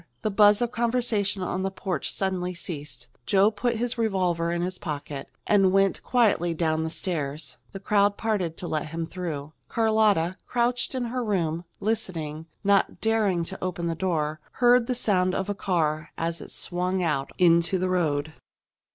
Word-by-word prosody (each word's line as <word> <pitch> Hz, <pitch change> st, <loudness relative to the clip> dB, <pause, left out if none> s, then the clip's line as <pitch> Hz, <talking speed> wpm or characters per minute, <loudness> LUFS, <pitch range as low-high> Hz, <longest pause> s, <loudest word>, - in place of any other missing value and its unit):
The 215 Hz, -, 0 dB
buzz 205 Hz, +2 st, +5 dB
of 240 Hz, -, -1 dB
conversation 230 Hz, -5 st, 0 dB
on 180 Hz, +1 st, -2 dB
the 195 Hz, -, 0 dB
porch 190 Hz, -4 st, -3 dB
suddenly 180 Hz, -2 st, -2 dB
ceased. 150 Hz, -7 st, -7 dB, 0.2 s
Joe 200 Hz, +2 st, +5 dB
put 235 Hz, +3 st, -1 dB
his 240 Hz, +1 st, -2 dB
revolver 180 Hz, -6 st, +1 dB
in 175 Hz, 0 st, -1 dB
his 185 Hz, +1 st, -4 dB
pocket 145 Hz, -2 st, -5 dB, 0.2 s
and 195 Hz, -3 st, +4 dB
went 195 Hz, 0 st, +2 dB
quietly 205 Hz, -9 st, +2 dB
down 160 Hz, -1 st, +1 dB
the 160 Hz, -, -2 dB
stairs. 155 Hz, -4 st, -3 dB
The 195 Hz, -, -7 dB
crowd 205 Hz, 0 st, +2 dB
parted 195 Hz, -7 st, -1 dB
to 175 Hz, -, -4 dB
let 155 Hz, -2 st, -2 dB
him 165 Hz, +1 st, -3 dB
through. 160 Hz, -4 st, -5 dB, 0.2 s
Carlotta, 215 Hz, -6 st, +2 dB
crouched 245 Hz, +2 st, 0 dB
in 255 Hz, -, -1 dB
her 245 Hz, +1 st, -2 dB
room, 170 Hz, -6 st, -1 dB
listening, 165 Hz, -8 st, -3 dB, 0.2 s
not 200 Hz, 0 st, +2 dB
daring 215 Hz, -6 st, +2 dB
to 165 Hz, -, -7 dB
open 175 Hz, -2 st, -2 dB
the 165 Hz, -, 0 dB
door, 155 Hz, -3 st, -1 dB
heard 245 Hz, -1 st, +4 dB
the 250 Hz, -, 0 dB
sound 185 Hz, -6 st, +1 dB
of 195 Hz, +1 st, -2 dB
a -, -, +1 dB
car 165 Hz, -5 st, -1 dB
as 165 Hz, 0 st, -2 dB
it -, -, -9 dB
swung 180 Hz, +1 st, -1 dB
out 140 Hz, -5 st, 0 dB
into 170 Hz, +1 st, +4 dB
the 185 Hz, +1 st, 0 dB
road. 155 Hz, -4 st, 0 dB
185 Hz, 170 wpm, -26 LUFS, 165-210 Hz, 0.2 s, buzz